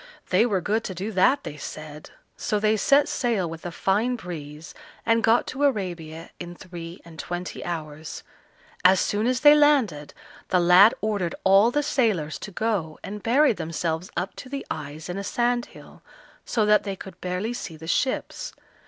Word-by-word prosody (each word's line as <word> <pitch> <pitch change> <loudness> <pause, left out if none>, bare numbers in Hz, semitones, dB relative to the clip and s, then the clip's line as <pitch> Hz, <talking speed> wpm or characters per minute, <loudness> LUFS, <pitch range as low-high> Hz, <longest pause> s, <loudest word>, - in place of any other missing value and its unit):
they 235 - +4
were 195 -5 0
good 215 +5 0
to 185 - -5
do 195 +5 -4
that, 220 +9 +3
they 150 - -7
said, 150 +1 -8 0.3
so 210 - -1
they 215 +1 +3
set 280 +7 +4
sail 225 -8 0
with 165 +1 -7
a - - -5
fine 210 +8 +1
breeze, 160 -6 -8 0.3
and 230 0 +3
got 225 +2 +4
to 270 +3 -4
Arabia 175 - -2
in 175 0 -7
three 170 -1 -9
and 165 -1 -13
twenty 175 +1 -5
hours. 155 -2 -6 0.6
As 185 +1 +6
soon 210 +3 0
as 250 -1 0
they 295 0 +9
landed, 270 - +2 0.3
the 180 - +3
lad 180 +5 +7
ordered 200 -5 -1
all 195 +4 +6
the 295 +4 0
sailors 215 - 0
to - - -7
go 190 -7 -2
and 210 +1 -6
bury 270 +5 +4
themselves 165 0 -3
up 180 +2 -3
to 255 - -9
the 275 0 -5
eyes 155 +1 -6
in 180 +2 -4
a - - -4
sandhill, 240 +3 -2 0.4
so 220 -3 +1
that 210 0 +5
they 195 -2 -4
could 185 -1 -11
barely 185 +6 -2
see 165 -9 -7
the 160 - -10
ships. 255 +10 -1
190 Hz, 180 wpm, -25 LUFS, 165-230 Hz, 0.6 s, they